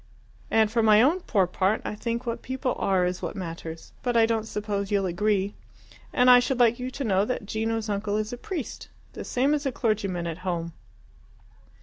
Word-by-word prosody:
And 220 -1 +3
for 230 - +2
my 215 -1 +6
own 295 +10 +4
poor 205 - +1
part, 190 +4 0
I - - -2
think 235 +3 -3
what 235 -1 -3
people 260 -1 -2
are 190 -2 +2
is 180 0 -2
what - - -4
matters, 165 -3 -7
but 245 -2 0
I 225 - +6
don't 225 -1 -1
suppose 205 -2 -3
you'll 200 -2 +1
agree. 200 +2 0 0.6
And 250 - +3
I 250 0 +9
should 255 +1 -1
like 235 0 +4
you 250 +1 -3
to 275 +2 -5
know 195 -4 +2
that 230 -1 -3
Gino's 225 +1 -2
uncle 205 0 -1
is 215 +2 -2
a - - -5
priest 340 - -6 0.3
the - - -6
same 270 +4 +1
as 290 -1 0
a - - 0
clergyman 200 -7 -1
at 165 0 -4
home." 170 -3 -3
215 Hz, 205 wpm, -26 LUFS, 195-245 Hz, 0.6 s, I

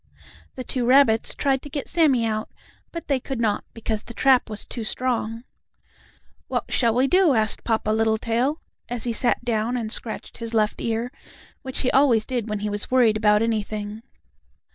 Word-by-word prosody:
The 255 - -5
two 250 0 -2
rabbits 245 -3 +4
tried 270 -2 +1
to 290 - -10
get 285 -1 -4
Sammie 280 -9 +3
out, 215 -1 -2 0.4
but 335 - -7
they 275 -2 +1
could 265 0 -5
not, 215 -3 0
because 220 -1 -3
the 235 - -11
trap 260 -3 +3
was 215 -1 -4
too 235 - -6
strong. 230 -1 -2 1.0
"What - - -1
shall 235 -3 +2
we 255 +2 +3
do?" 360 -2 +4
asked 215 -2 +2
Papa 220 -2 0
Littletail, 225 +6 +1 0.3
as 240 -2 -3
he 240 - +1
sat 240 +1 +1
down 235 +1 0
and 220 -3 -4
scratched 225 -1 -5
his 230 0 -5
left 215 -1 +1
ear, 230 +2 -2 0.5
which 260 -1 -4
he 255 - +1
always 250 -6 +4
did 240 -4 -3
when 210 -1 -3
he 210 - -2
was 205 0 -2
worried 245 -4 +4
about 210 0 +3
anything. 215 -1 -3
230 Hz, 180 wpm, -23 LUFS, 220-255 Hz, 1.0 s, rabbits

